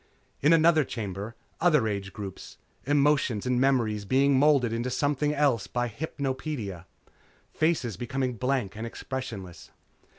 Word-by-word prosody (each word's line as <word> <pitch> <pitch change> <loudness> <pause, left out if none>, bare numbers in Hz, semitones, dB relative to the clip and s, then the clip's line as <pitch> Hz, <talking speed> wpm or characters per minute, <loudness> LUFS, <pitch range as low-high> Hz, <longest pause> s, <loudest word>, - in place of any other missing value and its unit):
In 160 +2 +5
other 160 -2 +5
chambers, 105 -3 -5 0.3
other 150 -9 +3
age 100 -2 -3
groups. 100 -2 -8 0.3
Emotion 145 -5 +2
and 125 0 +1
memory 115 -6 +2
being 135 +6 +3
moulded 135 -4 +4
into 120 +2 -1
something 145 +3 0
else 140 -7 +1
by 120 0 -1
hypnopedia. 130 - -4 0.7
Faces 150 - 0
becoming 130 +1 -2
blank 125 -4 -1
and 110 +2 -5
expressionless. 115 -8 -7
130 Hz, 125 wpm, -27 LUFS, 110-145 Hz, 0.7 s, In